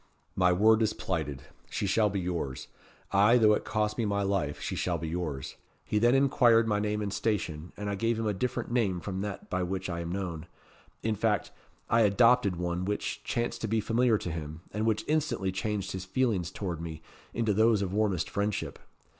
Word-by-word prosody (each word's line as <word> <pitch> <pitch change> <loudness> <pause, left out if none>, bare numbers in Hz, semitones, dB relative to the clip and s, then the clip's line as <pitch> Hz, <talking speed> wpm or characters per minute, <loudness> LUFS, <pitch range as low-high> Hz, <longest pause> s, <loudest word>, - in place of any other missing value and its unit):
'My 90 -1 +4
word 110 +5 +5
is 110 -1 +2
plighted. 75 -10 -3 0.3
She - - -2
shall 105 +2 +3
be 100 0 -2
yours. 85 -7 -3 0.4
Ay, 105 +5 +5
though 110 -3 +5
it - - 0
cost 105 0 -1
me 115 - +1
my 100 -1 0
life, 95 -8 -1
she - - -3
shall - - 0
be 80 - -5
yours.' 80 -5 -4 0.3
He 105 - +1
then 120 +3 +4
inquired 120 -4 +4
my 105 -2 +1
name 105 0 -1
and 100 -1 -3
station, 90 -7 -2
and 105 - -4
I 100 - -1
gave 115 +3 0
him 115 - -2
a 105 - +1
different 120 +4 -2
name 105 -7 +1
from 95 +1 -4
that 100 -1 -5
by 90 - 0
which 95 +1 -3
I 85 - -3
am 85 0 -4
known; 85 -4 -4 0.6
in 110 - +1
fact, 105 0 0 0.4
I 115 - +3
adopted 105 -2 +4
one 90 +1 -2
which 105 +2 -3
chanced 120 0 -2
to 115 - -1
be 110 +1 +1
familiar 115 +1 +2
to 90 - -5
him, 80 0 -6
and 110 +2 -1
which 110 -2 0
instantly 145 -11 0
changed 100 0 -2
his 95 -1 -4
feelings 95 -4 0
towards 90 -6 -4
me 80 -1 -7 0.3
into 115 -3 0
those 110 0 +3
of 95 -1 -3
warmest 100 -5 +1
friendship. 100 0 -2
100 Hz, 205 wpm, -29 LUFS, 90-110 Hz, 0.6 s, word